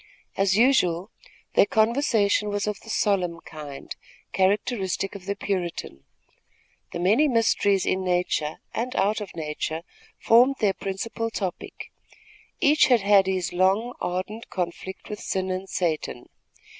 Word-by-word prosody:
As 195 0 +2
usual, 205 -7 +3 0.4
their - - +5
conversation 220 -3 +2
was 205 0 -1
of 210 -2 -3
the 225 - -14
solemn 185 -6 0
kind, 145 -3 -9 0.4
characteristic 195 0 0
of 195 -2 -10
the 200 - -1
Puritan. 175 - -4 0.9
The - - -4
many 210 - +3
mysteries 220 -6 +2
in 190 0 0
nature 175 -4 0 0.2
and 250 +2 -3
out 205 +3 +1
of 200 - -8
nature 160 0 -4 0.3
formed 245 +4 +5
their 205 -4 +2
principal 200 +5 -4
topic. 190 -5 -5 0.7
Each 295 +1 +5
had 245 -5 +4
had 200 -1 +5
his 185 -2 -1
long, 195 +7 +2
ardent 185 +6 -4
conflict 185 +1 -5
with 210 -1 -6
sin 190 0 -2
and 185 +1 -4
Satan. 155 -8 -2
195 Hz, 130 wpm, -25 LUFS, 180-220 Hz, 0.9 s, their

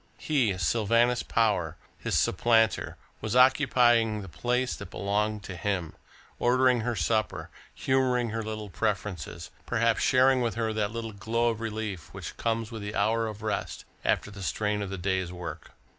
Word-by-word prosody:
He, 125 -11 +1
Sylvanus 115 +6 +2
Power, 90 -8 0 0.2
his - - -1
supplanter, 115 +3 +2 0.2
was 110 +1 -2
occupying 120 -5 +4
the - - -9
place 125 +9 -1
that 100 - -9
belonged 105 +1 -1
to 95 - -7
him, 90 -2 -2 0.5
ordering 125 0 +4
her 120 +1 -1
supper, 110 +3 -1 0.2
humouring 125 -3 +1
her 115 +1 -2
little 110 -2 -5
preferences, 100 - -3 0.2
perhaps 115 0 +2
sharing 130 0 +4
with 115 -5 -1
her 110 -1 -1
that 105 -1 0
little 115 -1 -5
glow 115 +4 0
of 115 -1 -3
relief 110 -5 -4
which - - -7
comes 115 0 -1
with 110 -2 -6
the 105 +1 -5
hour 115 +2 +1
of 110 0 -7
rest, 110 - -3 0.2
after 100 - 0
the 100 -1 -10
strain 105 +2 -1
of 100 - -4
the 95 - -4
day's 95 -1 -1
work. 85 -3 -8
110 Hz, 160 wpm, -28 LUFS, 100-120 Hz, 0.5 s, occupying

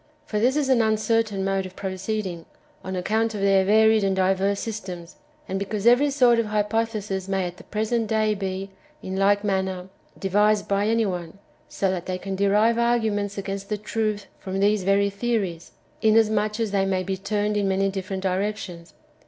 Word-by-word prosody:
For 210 - -2
this 250 +5 +2
is 295 -2 +1
an 260 -3 +4
uncertain 220 -2 +1
mode 195 -1 0
of 185 - -15
proceeding, 190 -2 -4 0.4
on 190 0 -4
account 220 +4 0
of 200 - -4
their 195 -1 +4
varied 220 +2 +4
and 195 -1 +1
diverse 190 +1 +1
systems, 185 -6 -6 0.3
and 190 +1 -2
because 200 +1 -3
every 245 +5 +5
sort 250 -4 +4
of 230 - 0
hypothesis 210 -2 -1
may 195 -1 0
at 175 0 -6
the - - -13
present 220 +2 -1
day 215 0 +1
be, 195 -1 -4 0.3
in 190 - -4
like 200 +1 +3
manner, 190 -2 -2 0.3
devised^ 205 +2 +2
by 200 +1 +1
any 225 0 +2
one; 175 -2 -4 0.3
so 195 -1 0
that^ 180 -2 -4
they 185 -1 -3
can 195 +1 -5
derive 210 +4 +3
arguments 220 -4 0
against 195 0 -5
the 210 - -1
truth 210 -1 -2
from 190 0 -4
these 205 +1 +3
very 200 +1 +2
theories, 200 -6 -2 0.3
inasmuch 215 -1 +3
as 225 -3 -1
they 195 -1 +2
may 185 -1 0
be 190 +1 -2
turned 205 +2 -1
in 205 -1 +1
many 195 0 +1
different 190 0 -4
directions. 190 -3 -3
200 Hz, 180 wpm, -24 LUFS, 190-215 Hz, 0.4 s, every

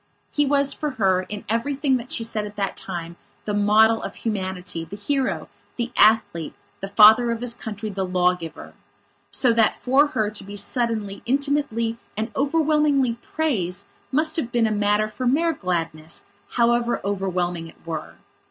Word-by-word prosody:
He 290 -1 +2
was 280 0 +4
for 300 - -3
her, 185 -3 +2
in 210 +1 -6
everything 270 +5 +1
that 245 +1 -9
she 230 - -1
said 215 -2 -2
at 205 - -12
that 200 -2 -2
time, 170 -2 -6 0.3
the 210 - -2
model 215 +2 +4
of - - -6
humanity, 185 -5 -3
the 165 +5 -8
hero, 265 +6 -1 0.3
the 240 0 -3
athlete, 210 -7 +3 0.2
the 195 - -5
father 220 +4 +7
of 230 -1 -1
his 245 -1 0
country, 220 -2 -6
the 195 -1 -2
law 180 -1 +2
giver. 165 -3 -9 0.6
So 250 -3 +3
that 225 -1 +3
for 270 +4 +3
her, 215 -8 -1
to 210 - -6
be 200 +1 -9
suddenly, 215 -1 -2
intimately 270 -4 0 0.2
and 220 +2 -2
overwhelmingly 290 -3 +2
praised 205 - -1 0.3
must 310 +5 +1
have 245 -7 -2
been 235 -1 +2
a 220 - +1
matter 210 0 +2
for 250 +4 -4
mere 325 +6 +2
gladness, 165 - -3 0.3
however 240 0 +2
overwhelming 180 -4 -2
it 160 - -15
were. 160 -2 -5
220 Hz, 165 wpm, -23 LUFS, 195-255 Hz, 0.6 s, father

